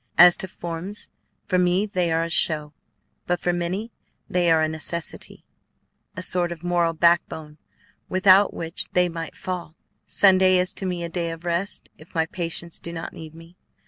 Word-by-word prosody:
As 175 0 +9
to 190 - -3
forms, 175 +3 -5 0.4
for 185 -2 +1
me 180 +3 +2
they 180 -5 -1
are 165 0 +1
a 165 - -4
show, 150 -2 +3 0.5
but 175 0 0
for 175 - 0
many 185 +6 -3 0.4
they 175 -1 +1
are 160 -1 +4
a - - +2
necessity, 160 +1 -5 0.7
a 185 - -4
sort 175 -1 +1
of 170 -1 -8
moral 175 -1 +1
backbone 160 -2 +1 0.5
without 190 +1 +5
which 165 0 -2
they 180 0 +3
might 165 -1 -6
fall. 180 -3 -6 0.3
Sunday 185 -1 +5
is 180 +1 0
to 190 - -3
me 175 -1 -3
a - - -2
day 170 0 -3
of 165 +1 -8
rest 175 +4 -2
if 155 +3 -17
my 160 -1 +2
patients 170 0 -4
do 170 - -7
not 165 -1 -6
need 160 -1 -10
me. 165 +2 -15
175 Hz, 175 wpm, -23 LUFS, 165-180 Hz, 0.7 s, As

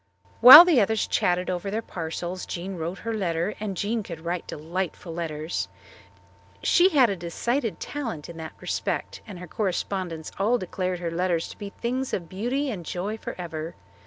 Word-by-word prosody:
While 265 +8 +13
the 320 -9 +4
others 220 +1 +1
chatted 180 0 +1
over 185 +2 -2
their 220 +3 -2
parcels 175 +1 -5
Jean 185 +2 -5
wrote 170 +2 -4
her 230 +2 -4
letter, 175 -2 -1
and 205 -3 -4
Jean 220 +4 -1
could 170 -5 -8
write 175 0 -3
delightful 170 +2 -4
letters. 160 -1 -3 1.0
She 365 +1 +5
had 265 - +4
a - - -1
decided 225 +8 -2
talent 230 - -5
in 170 - -10
that 160 -1 -7
respect, - - -3
and 200 -4 -8
her 180 - -8
correspondents 185 -3 -3
all 225 +5 +3
declared 185 -2 -3
her 170 -1 -2
letters 170 -1 0
to - - -11
be 205 -1 -5
things 250 +5 -2
of 170 -3 -6
beauty 255 +8 -2
and 185 -6 -6
joy 185 +6 -3
forever. 165 -6 -6
185 Hz, 170 wpm, -25 LUFS, 170-220 Hz, 1.0 s, While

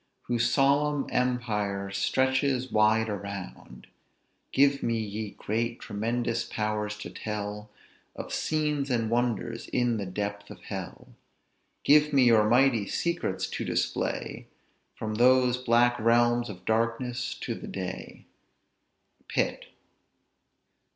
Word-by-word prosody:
Whose 120 0 +1
solemn 145 +1 +2
empire 105 -6 -1
stretches 130 +5 +1
wide 110 +1 +3
around; 100 - -7 0.7
Give 140 0 +3
me, 115 -1 0
ye 110 -1 -4
great, 115 +3 -2
tremendous 115 +2 -2
powers, 105 -1 -2
to 105 - -7
tell 105 0 -5 0.5
Of - - -6
scenes 150 -3 0
and 115 -3 0
wonders 115 -1 -1
in 120 -2 +1
the 100 -2 -4
depth 100 +2 -4
of - - -10
hell; - - -7 0.7
Give 150 +1 +5
me 135 -2 +5
your 110 -3 +5
mighty 120 -4 +4
secrets 170 - -1
to - - -3
display - - -2 0.5
From 110 0 -4
those 125 +2 +4
black 120 -1 +3
realms 120 +1 +3
of 90 -3 -10
darkness 115 +2 -1
to - - -4
the - - -8
day." - - -6 1.0
PITT. - - -1
115 Hz, 115 wpm, -28 LUFS, 105-125 Hz, 1.0 s, Give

